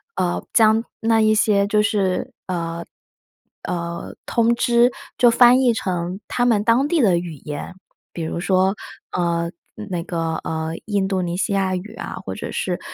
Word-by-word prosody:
呃， 175 -1 -1
将 220 0 +5 0.2
那 225 0 +3
一 215 0 +4
些 205 -2 +3
就 210 +1 +3
是， 200 -3 0
呃， 170 -2 -3 0.8
呃， 170 -1 -4
通 235 -1 +3
知， 240 +1 +3 0.3
就 240 -1 +6
翻 245 +2 +6
译 245 -3 +4
成 180 -3 -3
他 245 - 0
们 220 -4 +3
当 235 +5 +3
地 325 0 +2
的 190 -7 +4
语 170 -1 -4
言。 150 +2 -5 0.4
比 170 - -5
如 160 - -3
说， 190 +2 +2 0.4
呃， 170 -1 0 0.4
那 175 -2 -2
个， 165 -2 -2
呃， 160 0 -3 0.2
印 200 -3 0
度 190 -1 0
尼 175 0 -2
西 195 - -1
亚 190 -1 +1
语 210 +5 -7
啊， - - -6
或 - - -4
者 - - -6
是， - - -2
195 Hz, 180 characters per minute, -21 LUFS, 175-225 Hz, 0.8 s, 就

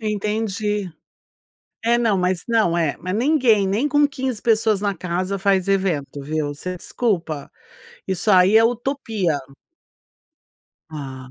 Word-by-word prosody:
Entendi. 210 -2 -2 0.9
É, 235 +1 +4
não, 225 -5 +2
mas, 180 -1 0
não, 215 -7 +2
é, 160 -4 0
mas 185 +2 -4
ninguém, 240 -5 +3
nem 210 +10 0
com 290 +1 +4
15 265 -5 -4
pessoas 220 -3 +2
na 200 -1 -1
casa 185 +3 -2
faz 195 -1 +1
evento, 170 -8 -1
viu. 150 +1 -2
Você 180 +5 -6
desculpa, 170 - -2 0.6
isso 190 +3 0
aí 185 +2 +5
é 225 - +5
utopia. 225 - -1 1.5
Ah. 130 -4 -8
200 Hz, 125 wpm, -21 LUFS, 175-225 Hz, 1.5 s, aí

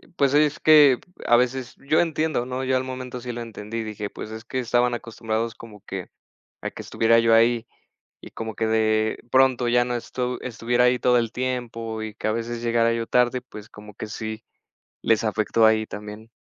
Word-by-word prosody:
pues 140 -4 +2
es 150 0 +3
que 150 -4 +7 0.3
a 120 - +5
veces 125 +1 0
yo 155 +3 +3
entiendo, 155 -6 0
¿no? 130 +1 -4
Yo 130 0 +1
al 130 - -2
momento 130 -1 -6
sí 120 0 -6
lo 120 - -5
entendí, 115 0 -6
dije, 105 -1 -5
pues 110 - -8
es 110 +1 -8
que 130 +1 -3
estaban 120 0 +1
acostumbrados 115 -1 -3
como 105 -3 -13
que 95 -2 -6 0.5
a - - -3
que - - -8
estuviera 115 +1 +3
yo 115 0 +3
ahí, 115 +1 +4 0.5
y - - -12
como 110 -1 -5
que 110 - 0
de 110 0 +1
pronto 130 -2 +3
ya 120 +1 +3
no 125 0 -3
estu 125 +1 -3
estuviera 120 0 0
ahí 125 0 +3
todo 125 0 +3
el 115 -2 -1
tiempo 115 -3 -3
y 110 -1 -6
que - - -5
a - - +1
veces 115 +1 -3
llegara 115 0 +2
yo 115 -1 -2
tarde, 125 0 +2
pues 110 -4 -12
como 105 0 -13
que 110 - -7
sí 110 0 -6 0.6
les 115 -1 +2
afectó 110 +1 +2
ahí 110 0 +4
también. 105 +1 -9
115 Hz, 200 wpm, -24 LUFS, 110-125 Hz, 0.6 s, que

